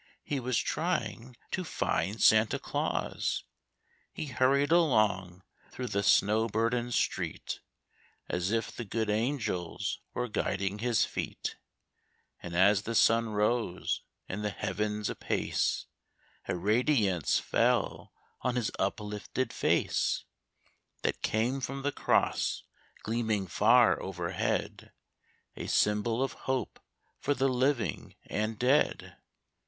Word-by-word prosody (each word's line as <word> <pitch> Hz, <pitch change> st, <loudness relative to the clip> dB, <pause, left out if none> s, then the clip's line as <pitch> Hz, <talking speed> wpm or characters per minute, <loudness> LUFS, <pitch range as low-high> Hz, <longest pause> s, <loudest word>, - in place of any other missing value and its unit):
he 145 Hz, -, -2 dB
was 125 Hz, -2 st, 0 dB
trying 125 Hz, -, -2 dB
to 185 Hz, -, -1 dB
find 110 Hz, -, -1 dB
Santa 110 Hz, 0 st, +5 dB
Claus. -, -, -2 dB, 0.7 s
He -, -, -5 dB
hurried 140 Hz, +2 st, +2 dB
along 105 Hz, -, +2 dB, 0.3 s
through 125 Hz, -1 st, -5 dB
the 100 Hz, -, 0 dB
snow 105 Hz, +3 st, +4 dB
burdened 115 Hz, +2 st, 0 dB
street -, -, -1 dB, 0.7 s
As 90 Hz, +1 st, -1 dB
if 115 Hz, +1 st, 0 dB
the 120 Hz, -, -6 dB
good 110 Hz, 0 st, -1 dB
angels 110 Hz, -6 st, -1 dB, 0.2 s
were 125 Hz, -, -1 dB
guiding 100 Hz, -2 st, -1 dB
his 120 Hz, -1 st, +2 dB
feet; -, -, -4 dB, 0.9 s
And 85 Hz, -1 st, -6 dB
as 100 Hz, +2 st, +5 dB
the 115 Hz, +3 st, -4 dB
sun 115 Hz, +1 st, +4 dB
rose 105 Hz, -2 st, 0 dB, 0.3 s
in 100 Hz, +3 st, -4 dB
the 105 Hz, -, -1 dB
heavens 105 Hz, +2 st, -2 dB
apace, -, -, -1 dB, 0.6 s
A 95 Hz, -, 0 dB
radiance 105 Hz, -, +2 dB
fell -, -, +1 dB, 0.3 s
on 125 Hz, -1 st, 0 dB
his 120 Hz, -3 st, 0 dB
uplifted 105 Hz, +5 st, -2 dB
face -, -, +1 dB, 0.8 s
That -, -, -1 dB
came 120 Hz, +5 st, 0 dB
from 135 Hz, +1 st, -4 dB
the 145 Hz, -, +1 dB
cross -, -, +1 dB, 0.4 s
gleaming 110 Hz, -3 st, 0 dB
far 90 Hz, -, +4 dB
overhead 90 Hz, -2 st, -3 dB, 0.6 s
A -, -, -6 dB
symbol 110 Hz, +4 st, +2 dB
of 135 Hz, -, -2 dB, 0.2 s
hope 130 Hz, -1 st, -1 dB, 0.4 s
for 145 Hz, -, 0 dB
the 135 Hz, +1 st, +2 dB
living 130 Hz, -1 st, 0 dB
and 110 Hz, +1 st, -2 dB
dead. 130 Hz, +6 st, +2 dB
110 Hz, 115 wpm, -30 LUFS, 105-125 Hz, 0.9 s, Santa